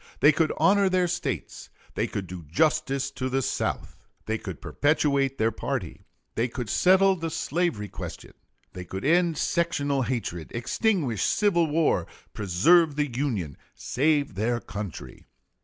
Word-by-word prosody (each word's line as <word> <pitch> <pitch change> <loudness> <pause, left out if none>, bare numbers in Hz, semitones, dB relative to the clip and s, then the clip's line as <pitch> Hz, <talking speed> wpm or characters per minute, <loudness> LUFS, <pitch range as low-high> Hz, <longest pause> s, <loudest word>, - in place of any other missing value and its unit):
They 145 - +7
could 155 +1 +1
honor 200 0 +4
their 185 -1 +2
States. 175 +1 -4 0.2
They - - -1
could 100 - -4
do 90 -1 -8
justice 135 - 0
to 130 -1 -3
the 135 +1 0
South. - - -3 0.2
They 110 0 -2
could 95 -7 -7
perpetuate 140 -2 +1
their 110 +1 +2
party. 110 - -4 0.3
They 115 +2 0
could 120 -2 -5
settle 190 +1 +4
the 165 -2 -4
slavery 160 -8 -1
question. - - -8 0.4
They 90 - -7
could 95 +4 -6
end 170 +1 +3
sectional 145 -6 0
hatred, 115 - -3
extinguish 130 - 0
civil 175 - +2
war, 150 - +1 0.3
preserve 140 - +3
the 145 -5 -2
Union, 110 - -2 0.2
save 145 -1 0
their 115 +5 0
country. 100 - -8
140 Hz, 140 wpm, -26 LUFS, 110-165 Hz, 0.4 s, They